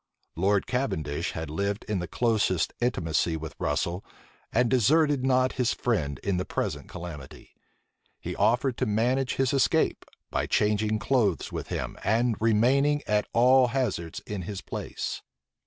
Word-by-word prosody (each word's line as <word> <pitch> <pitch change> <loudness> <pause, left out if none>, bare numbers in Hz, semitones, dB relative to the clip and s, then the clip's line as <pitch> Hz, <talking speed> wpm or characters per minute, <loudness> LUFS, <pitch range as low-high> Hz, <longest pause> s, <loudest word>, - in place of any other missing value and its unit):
Lord 100 +3 +2
Cavendish 80 - -2
had 80 -2 -5
lived 100 +5 -2
in 105 -3 -1
the 90 - -4
closest 105 -4 +1
intimacy 85 -8 0
with 80 -1 -7
Russel, 85 +6 -1 0.5
and 120 +1 +3
deserted 140 +3 +3
not 130 -1 +3
his 120 - +1
friend 75 - -1
in 100 -2 0
the 90 - 0
present - - -3
calamity. 85 -7 -9 0.7
He - - -5
offered 120 +2 +2
to 130 - 0
manage 125 +5 +1
his 135 -1 +1
escape, 135 - +2 0.3
by - - -1
changing 105 +1 +1
clothes 110 -6 +1
with - - -5
him, - - -4
and 115 +3 +2
remaining 135 +7 +3
at 105 0 +1
al 125 +2 +6
hazards 115 -10 -2
in 105 -3 -5
his 95 +2 -6
place. - - -5
110 Hz, 145 wpm, -27 LUFS, 90-125 Hz, 0.7 s, al